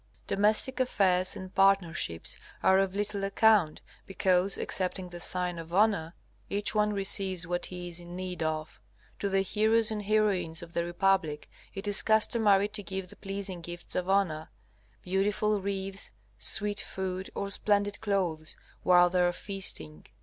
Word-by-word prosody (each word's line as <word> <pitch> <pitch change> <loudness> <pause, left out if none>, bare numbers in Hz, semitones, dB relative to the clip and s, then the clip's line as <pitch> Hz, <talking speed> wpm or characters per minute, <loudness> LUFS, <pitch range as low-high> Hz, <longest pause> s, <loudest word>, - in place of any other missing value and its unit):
Domestic 215 +6 +1
affairs 185 -7 +1
and 185 0 -9
partnerships 185 - +1 0.2
are 190 0 +5
of 195 -1 0
little 205 -1 -2
account, 200 -4 +3 0.3
because, 190 0 +1
excepting 185 -1 -2
the 175 0 -9
sign 180 -1 -1
of 165 0 -9
honor, 200 -5 +2 0.3
each 200 0 +2
one 210 -1 +2
receives 195 -3 0
what 175 +1 -2
he 180 -1 -7
is 175 0 -4
in 175 0 -10
need 180 -1 -5
of. 155 -4 -3 0.4
To 200 - -1
the 195 0 +2
heroes 220 +3 +2
and 215 -1 -3
heroines 195 -6 +1
of 170 0 -12
the 170 - 0
republic, 175 -4 0 0.3
it 195 +1 -5
is 205 -1 +3
customary 215 -2 +3
to 210 0 -3
give 190 -1 -5
the - - -13
pleasing 195 -2 -6
gifts 175 +1 -4
of 180 0 -2
honor, 175 -6 +1 0.5
beautiful 205 +2 0
wreaths, 195 0 -3 0.3
sweet 205 - +1
food, 190 0 -4
or 200 0 -2
splendid 205 0 +1
clothes, 175 -7 -2 0.3
while 180 -1 +5
they 180 0 +2
are 175 0 +3
feasting. 175 - -1
190 Hz, 155 wpm, -29 LUFS, 175-205 Hz, 0.5 s, are